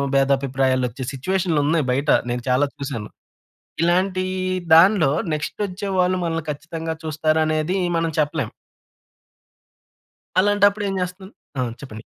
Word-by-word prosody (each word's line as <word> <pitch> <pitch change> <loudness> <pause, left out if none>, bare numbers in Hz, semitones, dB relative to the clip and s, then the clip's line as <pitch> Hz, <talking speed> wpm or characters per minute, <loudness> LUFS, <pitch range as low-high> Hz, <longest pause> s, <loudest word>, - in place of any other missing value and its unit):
భేదాభిప్రాయాలొచ్చే 135 -2 +1
సిచ్యుయేషన్‌లున్నాయి 160 -1 0
బయట, 140 +4 0 0.2
నేను 120 -1 -3
చాలా 135 +3 +3
చూశాను. 135 -7 -5 0.7
ఇలాంటీ 185 +2 +1 0.5
దాన్లో 170 -3 +6 0.2
నెక్స్‌టొచ్చేవాళ్ళు 185 +2 -1
మనల్ని 165 -1 -2
ఖచ్చితంగా 160 +2 -5
చూస్తారనేదీ 155 +2 0 0.2
మనం 165 0 0
చెప్పలేం. 150 -5 0 1.9
అలాంటప్పుడు 205 +1 +3
ఏం 195 - -2
చేస్తాను? 180 +2 -5 0.3
ఆ! - - +2 0.2
చెప్పండి. 110 -6 -9
160 Hz, 95 wpm, -22 LUFS, 140-185 Hz, 1.9 s, దాన్లో